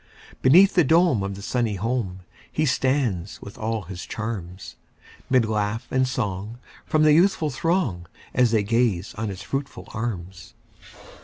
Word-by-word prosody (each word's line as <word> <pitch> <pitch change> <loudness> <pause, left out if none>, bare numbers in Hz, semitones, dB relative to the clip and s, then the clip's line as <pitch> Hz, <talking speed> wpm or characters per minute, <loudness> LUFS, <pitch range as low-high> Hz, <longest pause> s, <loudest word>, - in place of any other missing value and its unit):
Beneath 180 +10 +6
the 175 - +5
dome 160 - +4
of 100 0 -3
the 100 - -9
sunny 115 -3 -1
home, 100 -3 -2 0.3
He 155 - 0
stands 130 - 0
with 100 - -10
all 110 -1 -2
his 90 +1 -8
charms; 100 -5 -6 0.5
'Mid 130 -3 +4
laugh 110 +1 -1
and 130 0 +2
song 105 -2 -3 0.3
from 155 0 +2
the 155 -1 +6
youthful 165 -2 +3
throng, 135 - -1 0.3
As 125 -2 +4
they 110 -2 +2
gaze 110 -4 0
on 110 0 -3
his 100 0 -7
fruitful 135 0 -5
arms. 95 -6 -5
115 Hz, 150 wpm, -24 LUFS, 100-130 Hz, 0.5 s, Beneath